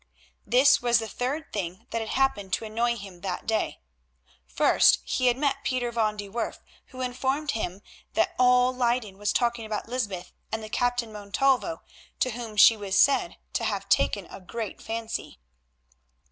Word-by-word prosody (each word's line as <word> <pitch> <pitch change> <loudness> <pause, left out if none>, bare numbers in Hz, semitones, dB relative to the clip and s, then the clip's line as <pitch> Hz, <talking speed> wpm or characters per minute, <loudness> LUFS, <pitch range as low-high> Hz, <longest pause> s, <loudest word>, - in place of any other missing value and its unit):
This 255 +6 +5
was 240 -1 +4
the 225 -1 -2
third 270 +8 -4
thing 185 -3 -4
that 230 - -1
had 220 - -5
happened 205 -8 0
to 225 - 0
annoy 235 +2 0
him 195 -5 -10
that 185 -2 -4
day. 220 - -1 0.7
First 60 - +5
he 255 - +1
had 245 0 +3
met 275 0 0
Pieter 245 -2 -1
van 215 -2 0
de 205 -1 -5
Werff, 230 +4 -3 0.3
who 255 -1 -9
informed 265 +4 -1
him 200 -4 -4 0.3
that 335 - +2
all 250 0 +5
Leyden 235 -5 0
was 205 - 0
talking 235 -1 0
about 215 0 -4
Lysbeth 205 -8 -4 0.2
and 220 0 -3
the 215 - -7
Captain 245 -1 0
Montalvo, 260 +10 0 0.4
to 255 - +1
whom 230 -2 -7
she 225 - +8
was 200 -3 -2
said 280 - +3 0.2
to - - -1
have - - -2
taken - - +2
a 190 - -9
great 220 +2 -6
fancy. 225 0 -5
230 Hz, 170 wpm, -27 LUFS, 205-250 Hz, 0.7 s, she